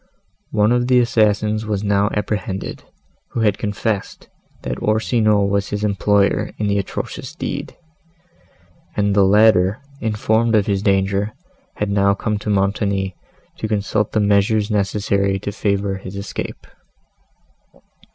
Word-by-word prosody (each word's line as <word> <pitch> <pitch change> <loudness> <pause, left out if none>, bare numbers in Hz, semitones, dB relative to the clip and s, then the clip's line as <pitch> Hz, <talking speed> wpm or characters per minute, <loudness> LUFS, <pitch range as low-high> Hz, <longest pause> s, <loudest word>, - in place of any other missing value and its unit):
One 105 +2 +2
of 120 0 +2
the 125 -1 +5
assassins 110 -2 +2
was 105 -1 -1
now 100 0 +2
apprehended, 105 -2 -3 0.5
who 115 - -1
had 105 -2 +2
confessed, 105 -1 -3 0.3
that 60 0 -4
Orsino 110 -1 +2
was 100 0 0
his 105 0 -3
employer 100 -1 +2
in 105 - -1
the 100 0 +1
atrocious 100 - -5
deed; - - -5 1.2
and 100 -1 +2
the 100 - +5
latter, 100 0 +4 0.2
informed 110 +1 +1
of 105 -2 +3
his 100 -2 0
danger, 100 +1 +1 0.4
had 105 -1 -2
now 100 0 +3
come 105 0 -2
to 105 - -5
Montoni 100 -1 0 0.4
to 110 - -2
consult 105 0 -1
on 110 - +3
the - - +1
measures 105 +1 +2
necessary 100 -1 +1
to 100 +1 -4
favour 100 -1 -1
his 95 0 -9
escape. 100 +1 -6
105 Hz, 135 wpm, -20 LUFS, 100-110 Hz, 1.2 s, the